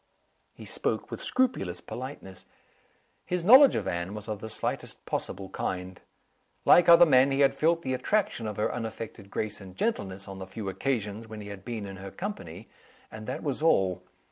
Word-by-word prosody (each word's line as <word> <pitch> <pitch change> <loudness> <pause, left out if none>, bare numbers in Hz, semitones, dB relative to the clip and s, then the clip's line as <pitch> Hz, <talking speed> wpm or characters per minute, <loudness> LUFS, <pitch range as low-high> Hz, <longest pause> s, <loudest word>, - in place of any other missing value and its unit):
He - - -11
spoke - - -2
with - - -5
scrupulous 235 - 0
politeness. 125 -8 -8 0.8
His 180 -1 -2
knowledge 260 +6 +9
of - - -2
Anne 85 +4 -3
was 105 0 -7
of 105 -2 -4
the 110 - -7
slightest - - -3
possible 95 +1 -3
kind. 90 -1 -4 0.6
Like 175 - +7
other 170 +1 +9
men, 135 -3 +5
he 135 +1 +1
had 135 -1 +5
felt 165 +4 +1
the 130 - -1
attraction 130 - 0
of 105 - -5
her 105 - 0
unaffected 110 -3 -6
grace 105 0 -3
and 95 -1 -11
gentleness 100 - -2
on 95 -1 -8
the 95 - -7
few 100 +1 -5
occasions 105 +1 -2
when 110 -1 -8
he 105 - -8
had 100 -2 -9
been 115 -4 -5
in 95 -1 -8
her 95 0 -8
company 110 - -7 0.4
and 110 0 -9
that - - -4
was 145 -1 -2
all. 95 - +3
110 Hz, 185 wpm, -28 LUFS, 95-140 Hz, 0.8 s, knowledge